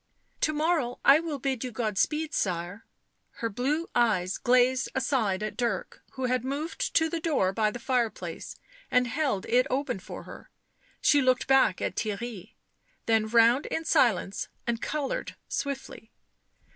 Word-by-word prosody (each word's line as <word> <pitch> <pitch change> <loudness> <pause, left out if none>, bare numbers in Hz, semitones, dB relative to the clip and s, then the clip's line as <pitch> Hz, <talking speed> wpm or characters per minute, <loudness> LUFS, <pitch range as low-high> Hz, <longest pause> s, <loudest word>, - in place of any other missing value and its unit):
" - - -42
To - - 0
morrow 305 -5 0
I 280 +2 +8
will 320 -3 -4
bid 265 -2 -2
you 250 - -4
God 220 -2 -2
speed, 305 +8 0
sirs:" 180 +1 -2 0.5
her 230 - -3
blue 290 +10 -1
eyes 210 -7 +1
glanced 250 +1 +3
aside 235 -7 0
at 215 - -4
Dirk, 240 -1 -2
who 260 -1 -3
had 250 -1 0
moved 285 +5 -3
to 320 - +4
the 330 +1 -3
door 285 - +1
by 215 0 +2
the 210 - -6
fire 240 -1 +1
place, - - -8 0.3
and 250 0 +3
held 245 -5 -1
it 250 +2 +3
open 260 -5 -1
for 185 - -9
her; - - -12 0.5
she 290 - +5
looked 255 -1 +2
back 265 -8 +3
at - - -2
Theirry, 215 -2 -4 0.5
then 220 -1 +2
round 235 +4 +4
in 325 - -3
silence 235 - +2 0.2
and 235 -1 -1
coloured 305 - -3
swiftly. 270 -5 -5
250 Hz, 160 wpm, -28 LUFS, 220-280 Hz, 0.5 s, I